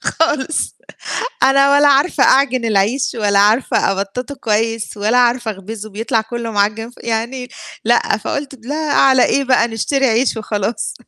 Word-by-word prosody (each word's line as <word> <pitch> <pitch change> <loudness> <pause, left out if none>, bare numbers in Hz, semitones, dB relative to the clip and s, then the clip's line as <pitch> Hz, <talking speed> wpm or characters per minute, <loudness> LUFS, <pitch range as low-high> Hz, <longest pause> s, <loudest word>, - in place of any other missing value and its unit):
خالص 315 -2 -1 0.7
أنا 275 +1 +4
ولا 285 0 +5
عارفة 280 +1 +3
أعجِن 260 -3 +3
العيش 225 +5 +1
ولا 205 -3 +1
عارفة 210 0 +2
أبَطَّطه 200 +8 -5
كويس 225 -2 -2
ولا 215 +4 +1
عارفة 240 -1 +1
أخبِزه 215 +2 -8
بيطلع 225 +3 -1
كُلّه 235 +1 -6
معَجِّن 215 +2 -1
ف - - -22
يعني 235 +3 -3 0.4
لأ، 235 -3 +2
فقُلت 270 +5 -5
لا 295 +3 -3
على 265 -2 +4
إيه 275 - +1
بقى 250 -2 +2
نشتري 265 +5 0
عيش 235 +2 +1
وخلاص. 215 0 -3
235 Hz, 145 wpm, -17 LUFS, 215-270 Hz, 0.7 s, ولا